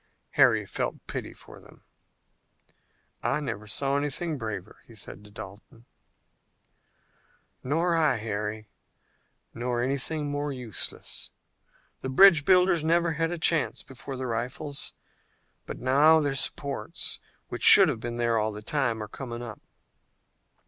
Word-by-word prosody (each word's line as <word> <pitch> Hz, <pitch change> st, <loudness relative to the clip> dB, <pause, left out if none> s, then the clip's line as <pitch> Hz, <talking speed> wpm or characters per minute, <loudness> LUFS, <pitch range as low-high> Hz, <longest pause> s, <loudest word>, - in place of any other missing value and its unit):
Harry -, -, +4 dB
felt -, -, -4 dB
pity -, -, -5 dB
for -, -, -15 dB
them. -, -, -18 dB, 1.4 s
"I 150 Hz, -, 0 dB
never 105 Hz, -8 st, -5 dB
saw 135 Hz, +6 st, 0 dB
anything 145 Hz, +3 st, 0 dB
braver," 110 Hz, -7 st, -6 dB
he -, -, -14 dB
said 100 Hz, -, -4 dB
to 105 Hz, -, -14 dB
Dalton. 110 Hz, +2 st, -12 dB, 1.8 s
"Nor 165 Hz, +6 st, +1 dB
did 165 Hz, -, +2 dB
I, 155 Hz, -4 st, +3 dB
Harry, 105 Hz, -1 st, -4 dB, 0.9 s
nor 120 Hz, 0 st, -2 dB
anything 140 Hz, +4 st, -1 dB
more 145 Hz, 0 st, -2 dB
useless. 125 Hz, -6 st, -4 dB, 0.7 s
The 130 Hz, -, -4 dB
bridge 160 Hz, +1 st, +7 dB
builders 180 Hz, -3 st, +4 dB
never 170 Hz, +1 st, +2 dB
had 165 Hz, +1 st, -1 dB
a 175 Hz, -, -3 dB
chance 165 Hz, -2 st, +2 dB
before 135 Hz, +1 st, -8 dB
the 130 Hz, -, -4 dB
rifles. 125 Hz, +5 st, -1 dB, 0.7 s
But -, -, -6 dB
now 145 Hz, +5 st, +5 dB
their 145 Hz, -3 st, 0 dB
supports, 135 Hz, -4 st, -3 dB, 0.3 s
which -, -, -6 dB
should -, -, +9 dB
have -, -, -1 dB
been 120 Hz, +1 st, -5 dB
there 115 Hz, -1 st, +2 dB
all 110 Hz, 0 st, 0 dB
the 105 Hz, 0 st, -8 dB
time, 110 Hz, +1 st, 0 dB
are -, -, -7 dB
coming 120 Hz, +1 st, -7 dB
up." 110 Hz, -4 st, -8 dB
130 Hz, 135 wpm, -27 LUFS, 115-155 Hz, 1.8 s, should